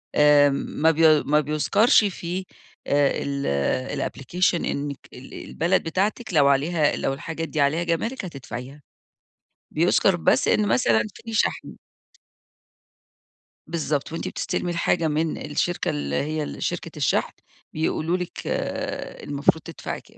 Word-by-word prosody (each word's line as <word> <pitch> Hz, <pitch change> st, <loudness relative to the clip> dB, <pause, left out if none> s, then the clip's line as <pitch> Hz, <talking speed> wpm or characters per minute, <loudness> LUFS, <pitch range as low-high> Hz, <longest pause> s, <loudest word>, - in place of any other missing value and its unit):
آمم 145 Hz, -1 st, +5 dB, 0.3 s
ما 160 Hz, +1 st, +6 dB
بي 155 Hz, -1 st, +5 dB
ما 150 Hz, +1 st, +3 dB
بيُذكَرش 175 Hz, -, +3 dB
فيه 185 Hz, -1 st, -3 dB, 0.4 s
آآ 140 Hz, -1 st, +3 dB
ال 130 Hz, -, -1 dB
الapplication 180 Hz, +7 st, 0 dB
إنِّك 140 Hz, -1 st, -3 dB, 0.2 s
ال 125 Hz, +2 st, -12 dB
البلد 175 Hz, +3 st, -1 dB
بتاعتِك 200 Hz, +6 st, -1 dB
لو 145 Hz, -3 st, +5 dB
عليها 145 Hz, +2 st, +2 dB
لو 135 Hz, -, -1 dB
الحاجات 165 Hz, +3 st, -5 dB
دي 155 Hz, -, -1 dB
عليها 150 Hz, +5 st, +2 dB
جَمارِك، 190 Hz, +7 st, -2 dB
هتدفعيها. 135 Hz, -2 st, -8 dB, 0.9 s
بيُذكَر 175 Hz, +3 st, +3 dB
بس 170 Hz, -, +2 dB
إن 210 Hz, -, +3 dB
مثلًا 115 Hz, -, +3 dB
فيه 225 Hz, 0 st, -9 dB
شَحْن. 220 Hz, -, -1 dB, 1.9 s
بالضبط، 155 Hz, -3 st, -2 dB
وأنتِ 165 Hz, -, -4 dB
بتستلمي 175 Hz, -, -2 dB
الحاجة 170 Hz, -1 st, +1 dB
من 155 Hz, +1 st, -1 dB
الشركة 175 Hz, +4 st, 0 dB
اللي 70 Hz, -1 st, -2 dB
هي 155 Hz, -, -1 dB
ال -, -, -6 dB
شركة -, -, -3 dB
الشَحْن، -, -, +1 dB, 0.4 s
بيقولوا 160 Hz, +2 st, 0 dB
لِك 180 Hz, -1 st, -6 dB, 0.8 s
المفروض 145 Hz, +3 st, +1 dB
تدفعي -, -, -6 dB
كام. -, -, -23 dB
155 Hz, 130 wpm, -24 LUFS, 140-175 Hz, 1.9 s, ما